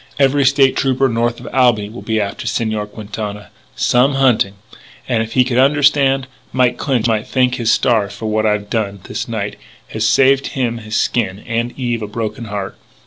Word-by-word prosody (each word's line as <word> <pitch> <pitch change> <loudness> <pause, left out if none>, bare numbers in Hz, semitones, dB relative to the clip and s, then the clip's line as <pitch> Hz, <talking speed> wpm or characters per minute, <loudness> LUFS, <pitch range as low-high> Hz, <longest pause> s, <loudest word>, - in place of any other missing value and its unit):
"Every 140 0 +3
State 135 0 +4
Trooper 135 0 +2
north 120 0 -1
of - - -10
Albany 120 -6 +3
will 110 +4 -9
be 110 -1 -1
after 100 -1 -3
Señor 110 -2 -2
Quintana. 105 -1 -7 0.2
Some 130 +3 +2
hunting! 125 -7 +2 0.5
And, 120 -3 +1
if 115 0 -5
he 130 - +5
could 125 -1 0
understand, 140 -1 +3 0.3
Mike 125 -1 +2
Clinch 130 -6 0
might 110 -1 0
thank 125 -1 +1
his 115 -3 +1
stars 110 -6 +1
that 110 - -6
what 110 0 +1
I've 105 -1 0
done 100 -4 -2
this - - -5
night - - -4 0.3
has 110 - -3
saved 135 +4 +4
him 120 -3 -1
his 110 -1 -6
skin 105 -4 0
and 115 +1 -2
Eve 120 -3 -2
a 105 - -4
broken 115 +2 -4
heart!" 100 -2 -5
115 Hz, 185 wpm, -17 LUFS, 110-130 Hz, 0.5 s, he